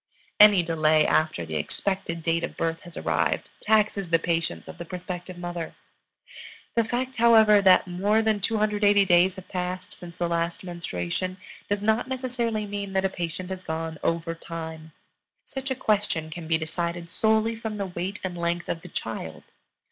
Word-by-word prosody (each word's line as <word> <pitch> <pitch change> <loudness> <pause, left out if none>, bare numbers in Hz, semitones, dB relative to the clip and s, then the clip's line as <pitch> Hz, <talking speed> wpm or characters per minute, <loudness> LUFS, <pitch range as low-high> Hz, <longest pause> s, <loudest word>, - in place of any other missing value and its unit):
Any 210 -4 +8
delay 155 -2 +3
after 155 - +1
the 80 -1 -3
expected 165 - -2
date 165 0 +1
of - - -5
birth 165 0 -1
has 175 -2 -11
arrived - - 0
taxes 210 -3 +2
the 165 - +5
patience 165 0 -2
of - - -10
the - - -4
prospective 180 +1 -6
mother. 175 -2 -5 1.0
The 230 - +3
fact, 250 +3 -3
however, 220 -3 +6
that 185 -2 +6
more 200 +5 +1
than 220 -1 +2
280 205 -1 +3
days 180 +1 +4
have 190 -2 -10
passed 180 0 -4
since 175 0 -11
the 175 - 0
last 170 +1 -1
menstruation, 175 - -3 0.3
does 205 0 0
not 220 +2 +2
necessarily 245 -4 -1
mean 200 -1 -5
that 190 0 +1
a - - +2
patient 180 +1 -5
has 185 -1 -5
gone 160 -1 -4
"over 165 0 -1
time." 160 -1 -7 0.5
Such 265 0 -5
a 265 - 0
question 205 -9 0
can 165 0 -7
be 160 0 +3
decided 170 +1 -4
solely 220 +2 +2
from 220 -1 -5
the 200 - -2
weight 185 +2 -4
and 185 -2 -3
length 170 0 -2
of 165 - -2
the 180 - -11
child. 80 - -5
180 Hz, 170 wpm, -26 LUFS, 165-210 Hz, 1.0 s, Any